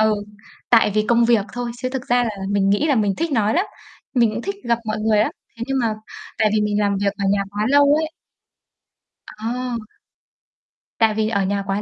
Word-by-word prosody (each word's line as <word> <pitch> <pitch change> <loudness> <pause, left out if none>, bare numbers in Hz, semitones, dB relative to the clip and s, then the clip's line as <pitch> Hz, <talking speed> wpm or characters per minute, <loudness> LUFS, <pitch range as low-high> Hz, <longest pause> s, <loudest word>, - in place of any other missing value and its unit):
ừ, 215 0 +4 0.6
tại 225 -3 +5
vì 215 0 +2
công 235 0 +4
việc 230 -4 +3
thôi 245 -1 -3
chứ 255 - -2
thực 260 -2 -4
ra 245 0 +3
là 230 - -1 0.2
mình 200 -1 +2
nghĩ 205 +10 +2
là 290 - +3
mình 205 -5 +1
thích 330 0 -1
nói 220 -4 +2
lắm. 360 +5 +2 0.5
Mình 235 -3 +4
cũng 230 - -4
thích 395 - -3
gặp 235 -1 +1
mọi 215 0 -2
người 215 -1 +2
lắm, 215 - +2 0.3
thế 230 - -3
nhưng 270 0 -1
mà 225 -2 0 0.4
tại 215 -1 +3
vì 215 - +3
mình 210 0 0
làm 200 -1 +1
việc 200 -1 +1
ở 200 - -2
nhà 200 0 +1
quá 205 +1 -2
lâu 285 +1 +5
ấy. 315 - -2 1.3
À! 245 +3 -3 1.2
Tại 225 -1 +3
vì 215 0 0
ở 200 -3 +1
nhà 200 +1 -1
quá 195 +1 -1
220 Hz, 220 wpm, -21 LUFS, 210-245 Hz, 1.3 s, tại